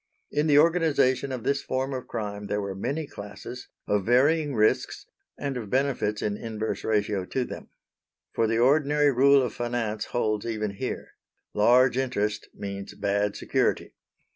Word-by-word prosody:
In 150 +2 +1
the 145 -1 +5
organisation 150 -5 +3
of 125 -3 -4
this 140 0 +1
form 130 +1 -2
of 130 -1 -5
crime 105 -3 -5
there 105 - -1
were 100 -1 -3
many 140 +11 -3
classes, 110 0 -9 0.2
of 105 -1 +1
varying 140 - +3
risks 110 0 +1 0.3
and 140 -2 -3
of 110 -5 -6
benefits 130 -5 0
in 105 -1 -1
inverse 110 -1 -4
ratio 105 -3 0
to 125 +6 -2
them. - - -9 0.6
For 115 - +2
the 115 +1 +1
ordinary 145 +3 +4
rule 135 +1 +5
of 125 - -3
finance 120 -3 -2
holds 110 -3 -1
even 110 -2 -2
here: - - -4 0.4
large 125 +4 +4
interest 105 -5 -1
means 100 -1 -6
bad 100 0 0
security. - - 0
120 Hz, 155 wpm, -26 LUFS, 105-140 Hz, 0.6 s, the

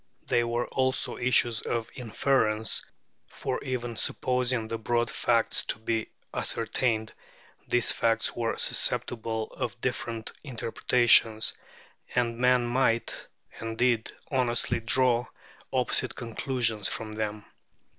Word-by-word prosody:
They 120 - +3
were 120 +1 0
also 130 0 0
issues 120 -2 +2
of 115 -1 -2
inference, 115 -2 +1 0.4
for - - -4
even 120 -3 -3
supposing 125 -3 0
the 115 0 -3
broad 120 0 0
facts 115 -2 +2
to - - -2
be 110 0 -1 0.3
ascertained, 110 -3 -1 0.5
these 120 -1 +3
facts 115 -1 +1
were 115 -1 -1
susceptible 110 -2 0
of 120 0 -4
different 115 -2 -3
interpretations, 115 -3 +3 0.6
and 120 -1 +1
men 125 -1 +4
might, 120 -1 +1 0.3
and 115 0 -4
did, 120 -2 +2 0.2
honestly 125 -3 +1
draw 120 +1 +2 0.4
opposite - - 0
conclusions 115 -2 -1
from 110 -1 -3
them. 105 -1 -3
120 Hz, 110 wpm, -28 LUFS, 115-125 Hz, 0.6 s, men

